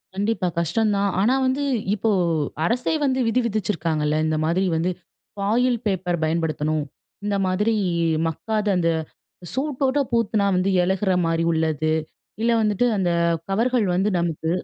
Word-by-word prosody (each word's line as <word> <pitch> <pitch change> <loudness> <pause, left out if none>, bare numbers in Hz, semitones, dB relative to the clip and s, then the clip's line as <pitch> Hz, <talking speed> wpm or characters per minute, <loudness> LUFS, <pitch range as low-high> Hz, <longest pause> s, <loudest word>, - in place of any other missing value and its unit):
கண்டிப்பா. 205 -1 0
கஷ்டந்தான். 200 +4 +1
ஆனா 235 +5 +3
வந்து 265 +2 0 0.3
இப்போ 220 +2 -1 0.6
அரசே 245 - 0
வந்து 260 -1 +1
விதி 250 +3 +2
விதிச்சிருக்காங்கல்ல. 165 -8 -1
இந்த 155 0 0
மாதிரி 180 +4 +1
வந்து 170 +3 0 0.4
ஃபாயில் 235 +5 +1
பேப்பர் 180 -3 -1
பயன்படுத்தணும். 155 -1 0 0.4
இந்த 205 -1 0
மாதிரி 210 +5 +1 0.5
மக்காத 215 +6 -2
அந்த 170 -1 +2 0.6
சூட் 270 +1 -2
போட்டு 270 +1 +2
பூத்துனாம் 205 -4 +1
வந்து 185 +2 +1
இழகுற 190 +2 0 0.2
மாதிரி 165 0 +1
உள்ளது. 155 -1 0 0.5
இல்ல 235 +1 +2
வந்துட்டு 210 +2 +1
அந்த 185 -3 +1 0.4
கவர்கள் 230 +2 +1
வந்து 190 +3 +1
நமக்கு 165 -1 -2
195 Hz, 130 wpm, -23 LUFS, 165-225 Hz, 0.6 s, ஆனா